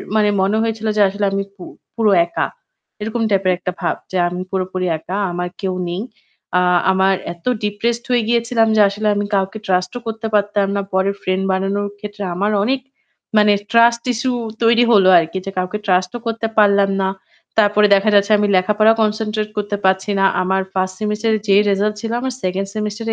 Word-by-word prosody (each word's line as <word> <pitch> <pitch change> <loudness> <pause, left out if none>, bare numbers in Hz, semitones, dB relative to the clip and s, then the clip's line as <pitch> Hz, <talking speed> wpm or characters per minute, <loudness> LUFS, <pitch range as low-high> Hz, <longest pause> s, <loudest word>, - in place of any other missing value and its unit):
মানে 210 -1 +3
মনে 200 +3 +1
হয়েছিল 225 -1 -3
যে - - +4
আসলে 200 +1 -2
আমি 195 0 -1
পু 185 - -11 0.3
পুরো 225 -3 +2
একা। 170 - -2 0.6
এরকম 225 +2 -3
টাইপের 190 -2 +2
একটা 180 0 -4
ভাব - - 0 0.2
যে 185 - -1
আমি 180 +1 -4
পুরোপুরি 185 -1 -2
একা। 180 +5 -6
আমার 175 0 -3
কেউ 190 -2 -1 0.2
নেই। 175 +3 -3 0.6
আ - - +2 0.3
আমার 190 0 +2 0.2
এত 170 -1 -24 0.2
ডিপ্রেসড 230 +3 -1
হয়ে 240 -2 +2
গিয়েছিলাম 235 -1 +2
যে 215 - +5
আসলে 210 +2 -3
আমি 205 0 -1
কাউকে 195 +2 -1
ট্রাস্ট 180 -1 0
ও - - -5
করতে 225 0 -4
পারতাম 205 -1 +1
না। 200 - 0
পরের 190 +1 +1
ফ্রেন্ড 185 +1 -1
বানানোর 195 +2 -1
ক্ষেত্রে 205 0 -7
আমার 205 +3 0
অনেক 265 +4 0 0.6
মানে 210 0 +5 0.2
ট্রাস্ট 235 0 +4
ইশ্যু 255 +3 -1 0.3
তৈরি 230 +1 +4
হলো 195 -4 +5
আরকি। 165 +3 -3
যে 195 - -4
কাউকে 185 +3 -2
ট্রাস্ট 185 -1 +1
ও - - -10
করতে 225 0 -2
পারলাম 200 -2 +4
না। 190 - +1 0.5
তারপরে 210 -1 +4
দেখা 200 +2 +2
যাচ্ছে 200 +1 +3
আমি 205 0 +1
লেখাপড়া 210 +4 +3
কনসেনট্রেট 215 0 -1
করতে 205 0 -2
পারছি 190 +2 +1
না। 195 - +3 0.2
আমার 190 +1 0
ফার্স্ট 185 0 -1
সেমেস্টারের 215 +1 0
যে 195 - +4
রিসাল্ট 205 +2 0
ছিল 225 - -4
আমার 260 0 -3
সেকেন্ড 190 +2 -2
সেমেস্টার 210 +1 -4
205 Hz, 185 wpm, -18 LUFS, 190-220 Hz, 0.6 s, যে